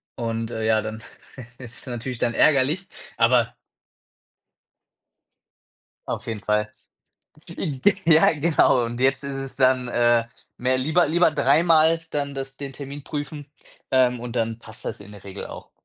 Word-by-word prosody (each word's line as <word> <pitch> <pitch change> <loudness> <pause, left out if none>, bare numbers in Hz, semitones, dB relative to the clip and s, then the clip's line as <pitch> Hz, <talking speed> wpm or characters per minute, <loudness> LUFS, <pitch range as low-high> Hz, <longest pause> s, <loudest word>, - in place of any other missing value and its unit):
Und, 115 -1 -3
äh, 110 -2 -3
ja, 110 -1 +3
dann 110 +1 -6 0.6
ist 120 -2 -10
es - - -5
natürlich 125 +1 -5
dann 120 - 0
ärgerlich, 150 +8 +3 0.3
aber 115 0 +3 2.5
Auf 115 - -5
jeden 110 -3 -4
Fall. 105 -1 0 0.9
Ich 140 -7 -4
g 205 - +5
ja, 160 -1 +6
genau. 150 -5 +3
Und 120 +1 -5
jetzt 135 +2 +2
ist 140 -1 -4
es 135 -1 -6
dann, 130 -1 +3
äh, 120 -1 +3 0.3
mehr 130 +1 +1
lieber 160 +6 +2
lieber 175 +1 +4
dreimal 160 +3 +3
dann 140 -1 -2
das 135 0 -6
den 140 -1 -6
Termin 140 +1 -8
prüfen, 145 -1 -6 0.4
ähm, 125 -2 +3
und 120 0 -6
dann 115 -1 -1
passt 110 -1 -11
das - - -4
in 100 0 -12
der 100 -2 -13
Regel 100 0 -7
auch - - -11
130 Hz, 155 wpm, -23 LUFS, 115-145 Hz, 2.5 s, ja